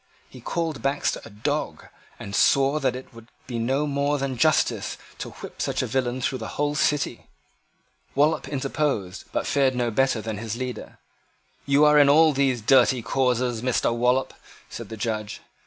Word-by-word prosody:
He -, -, -14 dB
called 160 Hz, -7 st, -3 dB
Baxter 140 Hz, +3 st, -1 dB
a -, -, -11 dB
dog, 105 Hz, 0 st, -3 dB, 0.3 s
and 100 Hz, 0 st, -7 dB
swore 140 Hz, +2 st, +3 dB
that 135 Hz, -3 st, 0 dB
it 130 Hz, 0 st, -10 dB
would 115 Hz, 0 st, -14 dB, 0.2 s
be 120 Hz, -2 st, -4 dB
no 135 Hz, +6 st, 0 dB
more 145 Hz, 0 st, 0 dB
than 135 Hz, -1 st, -2 dB
justice 155 Hz, +5 st, +1 dB, 0.2 s
to -, -, -5 dB
whip -, -, -10 dB
such -, -, -1 dB
a -, -, -1 dB
villain 130 Hz, -1 st, -1 dB
through 130 Hz, +1 st, -1 dB
the 110 Hz, -, -5 dB
whole 145 Hz, 0 st, 0 dB
City. 145 Hz, -4 st, 0 dB, 0.9 s
Wallop 150 Hz, +3 st, +2 dB
interposed, 135 Hz, -8 st, -2 dB
but -, -, -1 dB
fared 135 Hz, -2 st, +2 dB
no 120 Hz, -1 st, 0 dB
better 130 Hz, +1 st, +1 dB
than 110 Hz, -1 st, -5 dB
his 115 Hz, -1 st, -4 dB
leader. 125 Hz, 0 st, -6 dB, 0.7 s
"You 140 Hz, +2 st, +5 dB
are 150 Hz, 0 st, +6 dB
in 145 Hz, -1 st, +6 dB
all 155 Hz, +1 st, +6 dB
these 135 Hz, -3 st, +1 dB
dirty 125 Hz, +1 st, +4 dB
causes, 125 Hz, -1 st, 0 dB
Mr. 125 Hz, -1 st, +1 dB
Wallop," 125 Hz, +2 st, +1 dB, 0.4 s
said -, -, -7 dB
the 110 Hz, -, -7 dB
Judge. 110 Hz, -1 st, -3 dB
130 Hz, 170 wpm, -24 LUFS, 115-140 Hz, 0.9 s, are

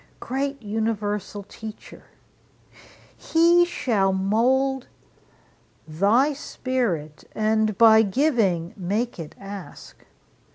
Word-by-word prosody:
Great 275 Hz, +2 st, -3 dB
universal 210 Hz, -1 st, -3 dB
Teacher! 220 Hz, +2 st, -11 dB, 1.1 s
he 340 Hz, +2 st, +4 dB
shall 220 Hz, -, 0 dB
mould 245 Hz, +7 st, +1 dB, 1.0 s
Thy 210 Hz, -, +2 dB
spirit, 235 Hz, -, -3 dB
and 215 Hz, -1 st, +1 dB
by 220 Hz, -1 st, +7 dB
giving 205 Hz, -, +1 dB
make 205 Hz, +4 st, -2 dB
it 155 Hz, -2 st, -8 dB
ask. 195 Hz, -1 st, -10 dB
220 Hz, 80 wpm, -24 LUFS, 195-260 Hz, 1.1 s, by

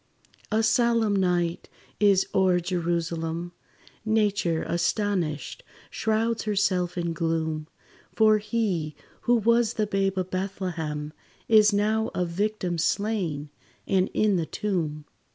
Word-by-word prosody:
A 220 Hz, +1 st, +2 dB
solemn 225 Hz, -1 st, +3 dB
night 175 Hz, -3 st, 0 dB, 0.3 s
is 200 Hz, -2 st, +4 dB
o'er 185 Hz, -2 st, +3 dB
Jerusalem; 170 Hz, -1 st, -2 dB, 0.5 s
Nature 205 Hz, -6 st, +1 dB
astonished, 175 Hz, -, -1 dB, 0.3 s
shrouds 225 Hz, +1 st, 0 dB
herself 185 Hz, -4 st, 0 dB
in 170 Hz, -1 st, -1 dB
gloom; 160 Hz, -1 st, -2 dB, 0.5 s
For 215 Hz, -1 st, +5 dB
he, 205 Hz, -8 st, -2 dB, 0.3 s
who 245 Hz, -, +6 dB
was 235 Hz, 0 st, +3 dB
the 215 Hz, -, +1 dB
babe 195 Hz, -1 st, 0 dB
of 185 Hz, 0 st, -2 dB
Bethlehem, 170 Hz, -6 st, -3 dB, 0.3 s
Is 215 Hz, -1 st, +6 dB
now 215 Hz, +2 st, +1 dB
a 180 Hz, -, 0 dB
victim 180 Hz, -1 st, -2 dB
slain, 175 Hz, -7 st, -1 dB, 0.3 s
and 190 Hz, -1 st, +1 dB
in 210 Hz, -3 st, +3 dB
the 165 Hz, -2 st, -2 dB
tomb! 160 Hz, -7 st, -2 dB
190 Hz, 115 wpm, -26 LUFS, 170-215 Hz, 0.5 s, who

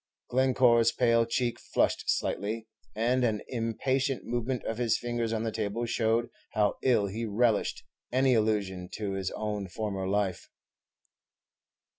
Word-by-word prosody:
Glencore's 125 Hz, -3 st, +4 dB
pale 115 Hz, -2 st, +3 dB
cheek 120 Hz, 0 st, -1 dB
flushed -, -, 0 dB
slightly, 110 Hz, +2 st, -1 dB, 0.3 s
and 120 Hz, +4 st, +2 dB
an 110 Hz, -3 st, 0 dB
impatient 130 Hz, +3 st, -1 dB
movement 120 Hz, +1 st, -2 dB
of 115 Hz, +1 st, -3 dB
his 115 Hz, -2 st, +2 dB
fingers 120 Hz, -1 st, -2 dB
on 110 Hz, -1 st, -1 dB
the 115 Hz, -, -1 dB
table 110 Hz, +2 st, -2 dB
showed 115 Hz, 0 st, +1 dB, 0.2 s
how 105 Hz, -1 st, +1 dB
ill 120 Hz, -6 st, +3 dB
he 105 Hz, +4 st, -4 dB
relished 110 Hz, 0 st, +1 dB, 0.3 s
any 130 Hz, +1 st, +3 dB
allusion 100 Hz, -5 st, 0 dB
to 105 Hz, -2 st, -3 dB
his 95 Hz, -1 st, -2 dB
own 105 Hz, -2 st, -3 dB
former 95 Hz, -1 st, -3 dB
life. 100 Hz, -1 st, -1 dB
115 Hz, 135 wpm, -29 LUFS, 105-120 Hz, 0.3 s, Glencore's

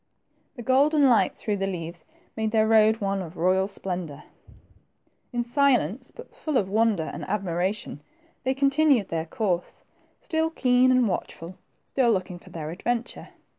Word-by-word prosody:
The 240 Hz, -, -8 dB
golden 280 Hz, +4 st, +4 dB
light 215 Hz, -6 st, +3 dB
through 210 Hz, -2 st, -2 dB
the 195 Hz, 0 st, -1 dB
leaves 170 Hz, -2 st, -6 dB, 0.3 s
made 220 Hz, -1 st, -1 dB
their 220 Hz, 0 st, +2 dB
road 220 Hz, 0 st, +4 dB
one 195 Hz, -1 st, -1 dB
of 175 Hz, -1 st, -9 dB
royal 185 Hz, +3 st, +2 dB
splendor. 175 Hz, -7 st, -5 dB, 1.1 s
In 240 Hz, -1 st, -1 dB
silence, 250 Hz, -, +1 dB
but 475 Hz, -, -13 dB
full 305 Hz, -4 st, -1 dB
of 195 Hz, -, +1 dB
wonder 215 Hz, -3 st, +2 dB
and -, -, -6 dB
admiration, 190 Hz, -4 st, -2 dB, 0.4 s
they 260 Hz, 0 st, 0 dB
continued 275 Hz, -4 st, +3 dB
their 165 Hz, 0 st, -3 dB
course, 180 Hz, -2 st, -2 dB, 0.4 s
still 320 Hz, 0 st, -1 dB
keen 255 Hz, -4 st, +3 dB
and 255 Hz, -2 st, +4 dB
watchful, 180 Hz, -2 st, -5 dB, 0.3 s
still 250 Hz, -3 st, +2 dB
looking 185 Hz, -3 st, -2 dB
for -, -, -16 dB
their 155 Hz, -2 st, -6 dB
adventure. 235 Hz, +7 st, -3 dB
215 Hz, 150 wpm, -25 LUFS, 180-255 Hz, 1.1 s, golden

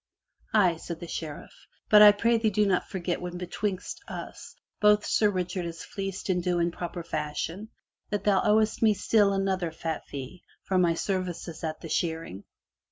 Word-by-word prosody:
'* -, -, -44 dB
*'Aye," 180 Hz, -6 st, +4 dB
said 165 Hz, 0 st, -7 dB
the 175 Hz, -, -7 dB
Sheriff. 155 Hz, -3 st, -6 dB, 0.3 s
"But 210 Hz, -1 st, +7 dB
I 210 Hz, 0 st, +11 dB
prithee 225 Hz, +2 st, +2 dB
do 210 Hz, +1 st, +2 dB
not 190 Hz, -3 st, +1 dB
forget 180 Hz, -2 st, -3 dB
when 180 Hz, 0 st, -5 dB
betwixt 185 Hz, +2 st, -4 dB
us -, -, -8 dB, 0.2 s
both 210 Hz, 0 st, +4 dB
Sir 210 Hz, -, +3 dB
Richard 180 Hz, -2 st, -2 dB
is 165 Hz, -1 st, -7 dB
fleeced 195 Hz, -1 st, -5 dB
in 180 Hz, -2 st, +1 dB
due 175 Hz, 0 st, 0 dB
and 170 Hz, 0 st, +1 dB
proper 175 Hz, -1 st, -5 dB
fashion, 160 Hz, +6 st, -4 dB, 0.4 s
that 205 Hz, -1 st, -2 dB
thou 200 Hz, -2 st, +3 dB
owest 215 Hz, +1 st, +2 dB
me 220 Hz, -2 st, +4 dB
still 205 Hz, 0 st, +3 dB
another 190 Hz, -3 st, 0 dB
fat 160 Hz, 0 st, -5 dB
fee, 140 Hz, +6 st, -8 dB, 0.2 s
for 190 Hz, -1 st, +1 dB
my 170 Hz, -2 st, +3 dB
services 180 Hz, -3 st, -3 dB
at 155 Hz, -1 st, -4 dB
the -, -, -7 dB
shearing. 160 Hz, -, -3 dB
180 Hz, 175 wpm, -27 LUFS, 170-205 Hz, 0.4 s, I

